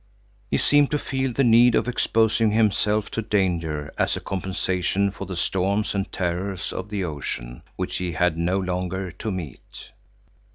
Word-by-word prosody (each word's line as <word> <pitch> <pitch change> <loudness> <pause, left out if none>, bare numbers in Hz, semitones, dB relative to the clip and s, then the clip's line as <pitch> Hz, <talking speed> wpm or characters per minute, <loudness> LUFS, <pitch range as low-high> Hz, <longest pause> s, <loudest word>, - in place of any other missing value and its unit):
He - - +2
seemed 145 -1 +4
to 150 - +1
feel 135 -2 -2
the 135 +4 +1
need 120 0 +6
of - - +1
exposing 115 -2 +2
himself 105 -1 +2
to 115 - -2
danger 85 -8 -1
as - - +2
a - - -3
compensation 95 +1 -1
for 100 - -7
the 95 - -5
storms 95 +4 0
and 100 0 -2
terrors 90 +2 -2
of 95 +2 -5
the 100 -2 -2
ocean, 65 -7 -5
which - - -3
he 90 -2 -3
had 85 0 +2
no 85 +3 0
longer 90 0 -2
to 110 - -5
meet. 85 -9 -8
95 Hz, 165 wpm, -24 LUFS, 90-110 Hz, -, need